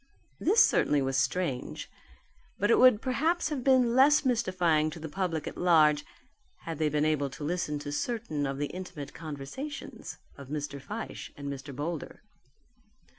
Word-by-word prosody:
This 425 +5 +5
certainly 145 -2 +2
was 135 0 -1
strange. 135 0 -1 0.7
But 205 +3 +2
it - - +5
would 255 -4 +6
perhaps 310 +6 +1
have 285 -5 -3
been 255 -3 +4
less 290 +3 +5
mystifying 180 -10 +2
to 155 - -9
the 160 - -6
public 165 -1 -2
at - - -6
large, 155 -4 +4 0.6
had 165 -2 -6
they 155 -1 +2
been 150 +1 +1
able 150 -3 +1
to 145 +3 -9
listen 150 -1 -1
to 145 0 -6
certain 155 - -2
of 135 0 -3
the 145 - -1
intimate 175 -6 -7
conversations 160 - -7 0.2
of 140 - -9
Mr. 145 -2 -4
Fyshe 210 +10 -6
and 140 -1 -4
Mr. 135 0 -9
Boulder. 155 +3 -5
160 Hz, 160 wpm, -29 LUFS, 145-235 Hz, 0.7 s, would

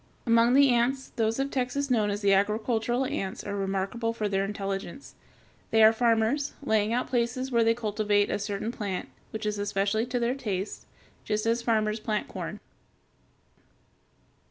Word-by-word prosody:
Among 230 +1 +4
the 280 0 +6
ants, 245 +3 +1
those 225 0 0
of 275 +1 -1
Texas 265 +2 -1
known 215 -4 +2
as 205 +1 -2
the 200 -1 +4
agricultural 220 +5 +1
ants 225 -9 -3
are 200 - -4
remarkable 195 +4 -2
for 215 -2 -2
their 195 -1 0
intelligence. 195 +6 -5 0.6
They 220 0 +5
are 220 +1 +8
farmers, 235 +5 +1
laying 220 -4 +1
out 245 +2 0
places 250 +2 -1
which 235 -1 +3
they 230 0 +4
cultivate 210 -2 +1
with - - 0
a - - -10
certain 205 +2 -3
plant, 200 -6 -4 0.2
which 220 0 -5
is 210 -1 -1
especially 205 +3 0
to 250 - -2
their 240 +1 +1
taste, 205 -7 -4 0.4
just 215 0 -1
as 230 +1 +1
farmers 220 -2 +1
plant 215 0 -2
corn. - - -6
220 Hz, 165 wpm, -27 LUFS, 205-240 Hz, 0.6 s, are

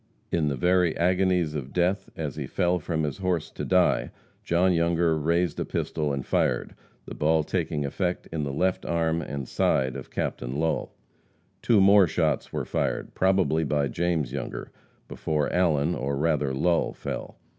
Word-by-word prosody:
In 80 -3 +1
the 70 - 0
very 90 +3 +2
agonies 90 -2 +2
of 70 -3 -5
death, 90 +2 0
as - - -4
he - - -4
fell 90 0 +1
from 80 0 -2
his 75 +1 -3
horse 90 -4 -1
to - - -6
die, - - +2 0.3
John 90 +2 +2
Younger 85 -1 +2
raised 85 +3 0
a - - 0
pistol 75 -2 -2
and 70 -2 -3
fired, - - 0 0.3
the - - -8
ball 80 +1 +2
taking 75 0 -2
effect 90 +5 -2
in 80 -2 -2
the 70 -1 -2
left 90 +6 0
arm 85 -1 0
and 70 -4 -5
side 65 0 +1
of - - -7
Captain - - -3
Lull. 80 0 -1 0.7
Two 115 -3 +4
more 100 -1 +6
shots 80 -1 0
were - - -3
fired, - - -2
probably 95 -4 +2
by 75 -1 +1
James 80 -7 -1
Younger, 70 - -5 0.4
before 75 -2 -2
Allen, 85 -3 +2
or 70 0 -2
rather 75 -2 +1
Lull, 85 +6 +1
fell. - - -6
80 Hz, 165 wpm, -26 LUFS, 75-90 Hz, 0.7 s, more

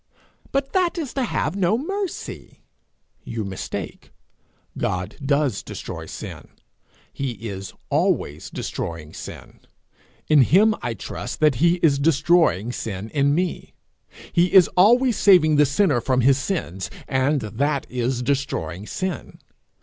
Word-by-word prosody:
'But 275 0 -1
that 365 -2 +1
is 300 -7 -4
to 270 - -1
have 180 -7 -1
no 200 +2 +2
mercy.' 390 +6 -5 0.6
You 115 -2 -4
mistake. 95 -1 -6 0.6
God 90 +3 -2
does 140 -4 +1
destroy - - -7
sin; - - -8 0.7
he 135 -3 -3
is 100 -3 -7 0.2
always 75 +2 0
destroying 80 -2 -5
sin. - - -10 0.7
In 150 -2 +6
him 200 - +5
I 120 -2 -3
trust - - -6
that 155 -2 +5
he 170 +1 +5
is 140 -4 +4
destroying 150 - +3
sin 110 -3 -5
in 140 -1 +2
me. 180 0 -3 0.6
He 175 +1 +3
is 185 -3 +7
always 240 +5 +4
saving 160 -6 +5
the 145 -1 +5
sinner 145 -3 +2
from 130 +1 +1
his 135 +2 +4
sins, 115 - -3 0.2
and 135 +2 +1
that 135 +7 -1
is 125 0 -2
destroying 120 - -2
sin. 185 -1 -4
140 Hz, 130 wpm, -23 LUFS, 115-180 Hz, 0.7 s, is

